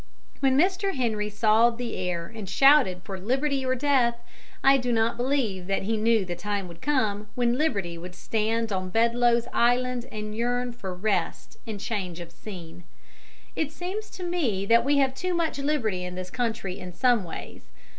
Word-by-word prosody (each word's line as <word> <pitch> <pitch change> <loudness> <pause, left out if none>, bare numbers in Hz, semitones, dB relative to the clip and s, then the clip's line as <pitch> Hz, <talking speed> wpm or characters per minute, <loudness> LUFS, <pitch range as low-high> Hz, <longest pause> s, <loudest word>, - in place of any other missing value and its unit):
When 270 -1 +3
Mr. 380 +4 +2
Henry 220 -5 -1
sawed 220 +2 +3
the 240 -2 -4
air 180 -2 -2
and 215 -1 -8
shouted 270 -6 +5
for 195 -2 -6
liberty 270 +6 0
or 255 0 +1
death, 255 -3 +2 0.5
I 275 0 +7
do 250 -2 -1
not 225 0 +2
believe 240 -8 -1
that 195 0 0
he 225 +3 0
knew 220 -1 +2
the 175 -1 -4
time 200 +2 -3
would 170 -1 -12
come 215 -8 0
when 240 -1 +2
Liberty 200 - -1
would 180 +1 -9
stand 225 +3 -1
on 185 -1 -2
Bedloe's 235 +2 +3
Island 245 +1 +2
and 215 0 -5
yearn 245 +2 0
for 215 -6 -6
rest 200 +2 -2
and 215 -2 -5
change 190 -5 -3
of 170 -1 -8
scene. 175 -4 -10 0.7
It 310 -2 -1
seems 375 +6 -5
to 370 - -6
me 285 - 0
that 230 +3 +5
we 285 +2 +2
have 270 -2 +3
too 360 +6 -2
much 330 -4 -1
liberty 245 -11 0
in 180 0 -5
this 185 0 -6
country 225 -6 -2
in 180 -1 -8
some 240 +2 +3
ways. 170 - -8
230 Hz, 180 wpm, -26 LUFS, 195-260 Hz, 0.7 s, I